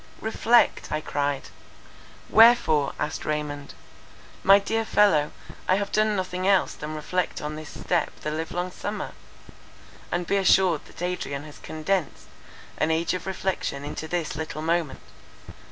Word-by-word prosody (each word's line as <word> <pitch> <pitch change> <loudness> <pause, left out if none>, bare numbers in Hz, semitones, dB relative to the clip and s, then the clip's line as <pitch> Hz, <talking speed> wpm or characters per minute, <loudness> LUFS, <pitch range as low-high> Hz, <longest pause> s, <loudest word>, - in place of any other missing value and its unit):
"Reflect!" 225 +2 +2
I 155 - 0
cried. 145 -2 -2 0.8
"Wherefore?" 220 -11 +5
asked 150 - -3
Raymond—"My 150 +5 -1
dear 225 +3 -1
fellow, 195 -9 +3 0.4
I 185 - +4
have 200 +1 -2
done 215 0 +2
nothing 185 -1 -2
else 195 -2 +3
than 155 +1 -6
reflect 180 +4 -2
on 150 +1 -4
this 155 -1 -8
step 170 -3 0
the 150 - -3
live 160 +1 -3
long 180 +1 -2
summer; 205 +3 -5 1.0
and 175 0 -1
be 200 - +1
assured 185 -4 +3
that - - -10
Adrian 175 -6 -3
has 150 -1 -12
condensed 160 +2 -2 0.5
an 155 - +2
age 160 +2 +1
of 180 0 -4
reflection 185 -7 -2
into 155 +2 -5
this 170 -2 -2
little 155 0 -5
moment. 165 -4 0
170 Hz, 140 wpm, -25 LUFS, 150-190 Hz, 1.0 s, Wherefore